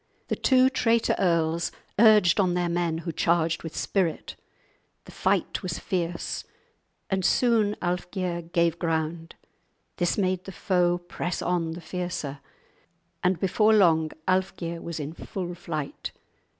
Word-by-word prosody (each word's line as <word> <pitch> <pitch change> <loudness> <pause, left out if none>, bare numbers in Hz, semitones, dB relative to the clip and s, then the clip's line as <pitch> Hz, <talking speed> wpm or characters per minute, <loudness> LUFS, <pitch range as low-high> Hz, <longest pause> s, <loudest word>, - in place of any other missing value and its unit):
The - - +1
two 260 -1 +4
traitor 235 -4 +2
earls 165 -2 +1 0.3
urged 210 -5 +6
on 180 -3 +2
their 175 -1 0
men, 170 -1 0
who 170 - -1
charged 165 0 +1
with 165 - -7
spirit. 180 -6 -1 0.7
The - - -12
fight - - 0
was 180 -3 -3
fierce, 175 -3 -3 0.7
and 190 -1 +1
soon 220 -1 +3
Alfgeir 175 -1 -3
gave 170 -1 +2
ground; 165 0 -2 0.6
this 175 -1 +1
made 185 -2 0
the 195 - -7
foe 175 -2 +1
press 175 0 -4
on 170 -2 0
the 170 - -8
fiercer, 170 -4 -4 0.8
and 180 -2 +2
before 215 +4 +3
long 160 -6 +4 0.2
Alfgeir 185 -3 -1
was 170 -1 -5
in 150 +1 -5
full 175 +1 -5
flight. 155 -4 -5
175 Hz, 135 wpm, -26 LUFS, 165-190 Hz, 0.8 s, urged